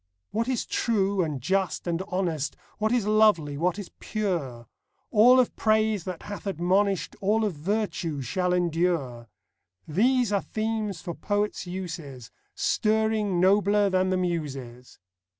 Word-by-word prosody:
What 225 +2 -1
is 255 -3 -1
true 200 -4 +1
and 150 -4 -3
just 190 +5 0
and 170 0 -1
honest, 170 -7 -2 0.2
What 215 +1 +1
is 240 -4 +1
lovely, 210 -9 +3
what 175 +5 0
is 205 -3 -7
pure, 165 - -3 0.2
— - - -47
All 245 +4 +7
of 250 - +1
praise 215 -3 +1
that 180 -3 -6
hath 205 0 -7
admonish'd, 190 +2 +1
All 215 +3 +2
of 205 - -1
virtue, 170 -2 -2
shall 180 +9 -1
endure, 165 -9 0 0.3
— - - -53 0.2
These 235 - +2
are 200 - +2
themes 215 -4 -3
for 170 - -5
poets' 205 +3 -2
uses, 165 -9 -7 0.2
Stirring 215 -3 +1
nobler 200 +2 +3
than 185 0 +2
the 185 - +1
Muses. 135 -9 -4
190 Hz, 145 wpm, -26 LUFS, 165-210 Hz, 0.3 s, All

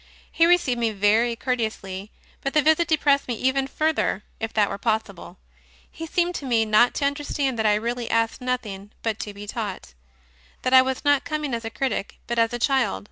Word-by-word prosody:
He 330 - +4
received 325 -9 +3
me 230 -1 +1
very 215 +3 +2
courteously, 220 -6 -3 0.3
but 275 - -3
the 300 - +4
visit 315 +2 +3
depressed 290 -3 +2
me 245 - -2
even 265 +3 0
fur 310 +3 0
ther, 210 -9 -1 0.2
if 225 0 -3
that 210 -2 +3
were 200 - -5
possible. 215 -5 -3 0.5
He 325 - -7
seemed 350 +2 0
to - - -8
me 230 -3 +2
not 215 +3 +4
to 285 - 0
understand 280 -3 -1
that 220 - +2
I 210 - +4
really 235 +2 -3
asked 230 +2 0
nothing 215 -6 -4
but 220 -2 -1
to 210 - -5
be 205 0 -9
taught; 205 - -5 0.7
that 255 - 0
I 260 - +9
was 260 +2 -3
not 285 -1 +4
coming 300 -4 -3
as 230 -1 -3
a - - -2
critic, 225 -3 -3
but 235 0 -2
as 230 0 +3
a 240 - -2
child. 260 - +1
240 Hz, 205 wpm, -24 LUFS, 215-275 Hz, 0.7 s, I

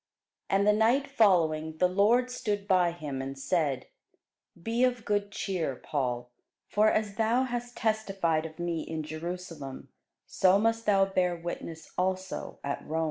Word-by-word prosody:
And 195 +1 +3
the 210 - +5
night 230 +6 +3
following 160 - +2
the 180 - +4
Lord 220 +7 +3
stood 205 -5 -2
by 185 -3 +4
him, 150 -6 -5
and 135 +1 -5
said, 135 -2 0 0.7
Be 230 +7 0
of 245 -2 +1
good 205 -1 0
cheer, 175 -9 -2
Paul: 125 -3 -3 0.4
for 215 +1 +4
as 210 -2 -1
thou 230 +3 +3
hast 245 -1 -4
testified 195 -8 0
of 155 - -15
me 170 -2 -2
in 160 0 -4
Jerusalem, 160 -3 -6 0.4
so 185 +1 +4
must 225 +1 +1
thou 195 -2 +5
bear 185 -2 +1
witness 165 -1 -7
also 185 0 -2
at 140 0 -3
Rome. 160 +1 -2
185 Hz, 150 wpm, -29 LUFS, 160-215 Hz, 0.7 s, the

